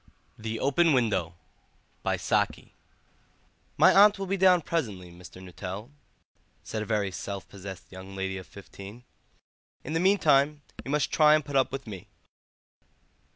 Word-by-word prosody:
THE 110 0 -5
OPEN 155 +4 +3
WINDOW 100 -9 0 0.7
"My - - 0 1.8
aunt 205 +1 +7
will 195 - -4
be 195 +1 -1
down 185 -2 +5
presently, 105 - -3
Mr. 90 +1 -13
Nuttel," 95 +6 -7 0.7
said 110 - -4
a 105 - -5
very 105 -3 0
self 100 +2 -6
possessed 95 -2 -10
young 95 +1 -10
lady 95 0 -3
of 95 - -12
fifteen; 100 +3 -12 0.8
"in 155 - -5
the 165 - +1
meantime 150 -6 +3 0.2
you - - -8
must 150 0 0
try 155 -1 +6
and 155 - -1
put 145 - -6
up 135 -1 +3
with 135 0 -5
me." 100 -5 -9
115 Hz, 140 wpm, -27 LUFS, 95-150 Hz, 1.8 s, aunt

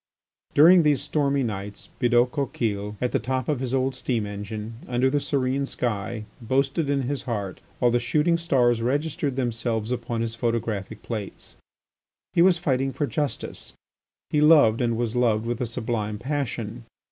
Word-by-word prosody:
During 170 +5 +8
these 150 -3 +3
stormy 140 -2 0
nights 100 -2 -5
Bidault 120 0 +3
Coquille 105 -8 -2
at 125 - 0
the - - +1
top 130 -1 -2
of 150 -4 0
his 130 -2 -3
old 135 0 +1
steam 120 -4 -1
engine, 105 +2 -6
under 125 +1 +1
the 145 - +2
serene 135 -1 0
sky, 110 -2 -3 0.2
boasted 135 +5 0
in 140 -1 +1
his 135 +1 -2
heart, 100 -6 -4 0.2
while 120 -1 +3
the 120 - +3
shooting 155 +7 +2
stars 125 -8 +2
registered 140 +2 -1
themselves 115 -3 -2
upon 120 -2 -2
his 115 -1 -2
photographic 115 -3 -2
plates. 105 -4 -6 0.8
He 170 - +4
was 180 0 +6
fighting 135 -5 0
for 145 - -1
justice. 145 -1 -4 0.6
He 150 - +2
loved 145 -7 +6
and 115 -2 +1
was 120 -1 -2
loved 115 -3 +2
with 120 0 -2
a 125 - 0
sublime 110 -3 -2
passion. 120 -3 -3
125 Hz, 160 wpm, -25 LUFS, 115-140 Hz, 0.8 s, During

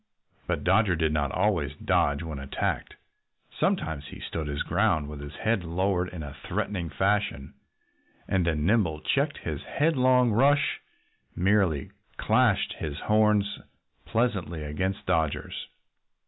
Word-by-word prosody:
But - - -1
Dodger 105 -5 +3
did 80 -1 +1
not 70 -3 0
always 90 -7 0
dodge 70 +2 +1
when 80 -4 -5
attacked. 70 0 -3 0.6
Sometimes 75 -3 0
he - - -10
stood 80 -2 -4
his 70 0 -2
ground, 85 -4 +1
with 75 -1 -7
his 70 +1 -8
own - - -12
head 110 -4 +1
lowered 90 +2 0
in 85 -4 -7
a 70 -2 -7
threatening 90 -5 -2
fashion. 95 -7 0 0.7
And 95 -3 +1
then 75 -2 0
Nimble 90 -7 +2
checked - - 0
his - - -4
headlong 130 -5 +3
rush 140 +6 +3 0.5
and - - -4
merely 95 -7 +2 0.3
clashed - - +2
his 75 -3 -4
horns 105 -1 +2 0.5
pleasantly 95 -9 -1
against 95 +6 -3
Dodger's. 80 -3 -1
90 Hz, 135 wpm, -27 LUFS, 75-105 Hz, 0.7 s, Dodger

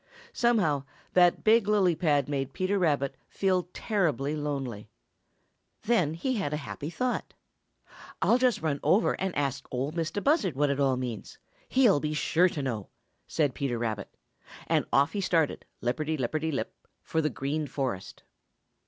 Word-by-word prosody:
Somehow 195 - +2 0.3
that 180 -1 +4
big 220 -1 +5
lily 200 -4 +4
pad 150 -4 +1
made 135 -2 -2
Peter 190 +2 0
Rabbit 145 -6 +1 0.2
feel 185 -3 0
terribly 155 - 0
lonely. 135 -8 -4 0.9
Then 205 -9 +2
he 260 +10 -1
had 170 -8 -2
a - - 0
happy 145 - -5
thought. 250 +9 -2 0.8
"I'll 245 - +3
just 250 -8 +2
run 145 -3 0
over 205 +5 +3
and 190 -1 -1
ask 140 -2 -2
Ol' 130 +3 -2
Mistah 165 +3 -2
Buzzard 275 - +2
what 145 +1 +2
it 140 - -2
all 135 -2 +2
means; 125 -4 -5 0.3
he'll 245 - +4
be 150 +1 -2
sure 175 +4 +3
to 145 -4 -4
know," 115 -7 -3 0.4
said 145 -5 +1
Peter 135 -4 -2
Rabbit, 110 -3 -3 0.6
and - - +1
off 140 +3 +3
he 205 - -1
started, 165 -5 +1 0.2
lipperty 155 +6 -1
lipperty 155 +5 -1
lip, 140 - -3 0.3
for 160 - 0
the 155 - +1
Green 145 +4 -2
Forest. 130 -10 -4
155 Hz, 155 wpm, -28 LUFS, 140-185 Hz, 0.9 s, big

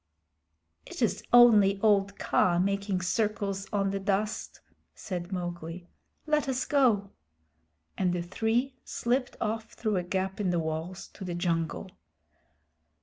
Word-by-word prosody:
"It - - -4
is - - +1
only 215 -5 +7
old 200 -2 +3
Kaa 175 -1 +2
making 195 0 0
circles 200 0 -1
on 195 -1 +1
the 195 - -2
dust," 205 +2 -2 0.4
said 180 -1 -5
Mowgli. 175 -1 -5 0.4
"Let 300 -2 +1
us 255 -1 -1
go." 235 -9 +2 0.9
And 185 -2 +2
the 175 -1 -2
three 225 +8 0
slipped 250 +2 -1
off 220 0 -3
through 215 -4 -1
a 180 - 0
gap 190 +2 -2
in 190 - +1
the 175 - +1
walls 160 +3 -4
to 200 - -11
the 180 -2 -4
jungle. 170 +1 -2
195 Hz, 135 wpm, -29 LUFS, 180-220 Hz, 0.9 s, only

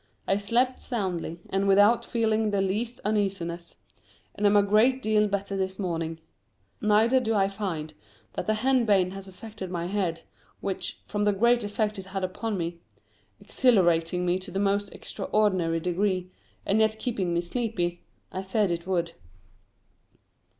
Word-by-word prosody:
I 195 - +3
slept 240 +5 +1
soundly, 180 -7 -3
and 195 +1 +1
without 205 +4 +5
feeling 220 -2 +1
the 200 -1 0
least 215 +6 -1
uneasiness, 190 -5 -1 0.6
and 205 - +1
am 205 - +4
a 205 - +5
great 220 +6 +4
deal 215 -3 +2
better 200 0 -2
this 190 -1 -2
morning; 165 -4 -3 0.6
neither 220 +5 +4
do 225 -3 0
I 195 -1 +3
find 185 -7 -4 0.4
that - - -4
the 215 - +2
henbane 215 -6 +3
has 195 0 -8
affected 190 0 -8
my 170 -1 -3
head, 180 -4 -2 0.4
which, 195 -1 -4
from 205 -1 -2
the 205 - +4
great 235 +3 +3
effect 210 0 -1
it 190 - -8
had 195 0 -4
upon 200 +3 -2
me 170 0 -3 0.6
exhilarating 180 -6 +2
me 180 +1 +1
to 185 +1 -7
the 185 - -4
most 200 0 +1
extraordinary 185 -6 0
degree, 185 +1 -1 0.3
and 205 +2 +2
yet 220 0 +3
keeping 210 -7 -2
me 170 0 +1
sleepy 175 -3 -2 0.3
I 190 - -3
feared 195 0 0
it 170 +1 -3
would. 170 -3 0
195 Hz, 155 wpm, -27 LUFS, 180-215 Hz, 0.6 s, without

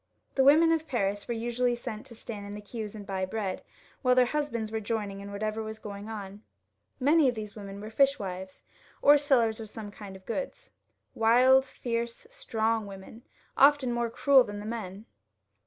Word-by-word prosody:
The 270 - +3
women 315 +4 +6
of 320 -1 0
Paris 205 -5 -1
were 235 - -2
usually 240 +2 0
sent 235 -3 -7
to 235 - -11
stand 210 -2 -7
in 205 - -7
the - - -6
queues 215 0 -6
and 205 -1 -8
buy 190 -1 -3
bread, 190 0 -3 0.4
while 250 -1 +4
their 255 -1 +6
husbands 240 -6 -2
were 220 - -1
joining 205 -2 -3
in 200 0 -8
whatever 215 +2 -3
was 220 0 -6
going 205 -1 -8
on. 205 -2 -7 0.6
Many 290 +1 +4
of 245 - -3
these 210 -2 -7
women 200 -1 -8
were 215 +2 -8
fishwives, 195 -8 0 0.4
or 290 +1 +7
sellers 240 -6 +2
of 220 -1 -7
some 215 -1 -8
kind 205 -2 -10
of 190 0 -14
goods, 280 - -5 0.4
wild, 255 +4 +5
fierce, 235 - -4
strong 225 - -1
women, 195 +3 -11 0.3
often 280 -2 +5
more 235 -1 0
cruel 270 +2 +5
than 205 -3 -7
the 205 - -7
men. 215 -2 -6
225 Hz, 185 wpm, -29 LUFS, 205-250 Hz, 0.6 s, or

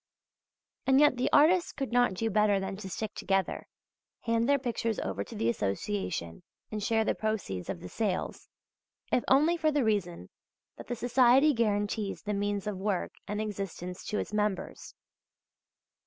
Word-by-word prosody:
And 265 0 +5
yet 295 -3 +5
the 250 - +1
artists 345 +4 +5
could 270 -3 -4
not 245 -5 +3
do 225 +4 -1
better 210 -1 +3
than 195 0 -4
to 190 -1 -7
stick 215 +3 -4
together, 195 -1 -1 0.5
hand 230 +1 +1
their 285 - +5
pictures 230 -4 -2
over 95 +1 -3
to - - -11
the 115 - -1
association 95 -5 -2 0.3
and 215 -1 -3
share 220 +1 +1
the - - +2
proceeds 205 - -3
of 85 - -4
the - - -7
sales, 195 - -3 0.6
if 245 - +2
only 305 +6 +4
for 315 -2 +2
the 290 -2 +1
reason 180 - -1 0.4
that - - -11
the 245 - -2
society 250 +5 +4
guarantees 205 -3 -1
the 210 - -2
means 205 0 -1
of 210 -3 -3
work 195 -2 -1 0.2
and 210 0 -3
existence 195 -4 -5
to 210 - -2
its - - -4
members. 210 -2 -2
210 Hz, 165 wpm, -30 LUFS, 190-245 Hz, 0.6 s, And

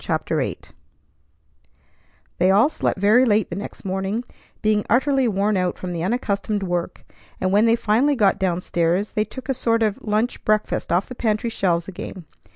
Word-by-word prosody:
CHAPTER - - -1
VIII - - -1 1.8
They 180 +2 +4
all 210 +9 +5
slept - - -1
very 215 +6 +5
late 215 -6 +2
the - - -3
next 200 - -8
morning, 195 +4 -2 0.4
being 210 -1 +2
utterly 265 +2 +3
worn 205 -1 +1
out 180 -1 -1
from 180 -1 -5
the 170 - -3
unaccustomed 205 0 -1
work; 175 -1 -3 0.3
and, 185 - 0
when 210 +3 +4
they 230 - +5
finally 235 +6 +2
got 205 -6 +2
down 180 -2 0
stairs, 175 +4 0
they 215 - 0
took 260 +5 -10
a 270 - +1
sort 230 -2 +1
of 210 -2 0
a - - -9
lunch 215 +4 0
breakfast 215 0 0
off 175 +3 +2
the - - -7
pantry 225 -1 -1
shelves 175 -5 0
again. 185 -1 -8
210 Hz, 180 wpm, -22 LUFS, 185-230 Hz, 1.8 s, all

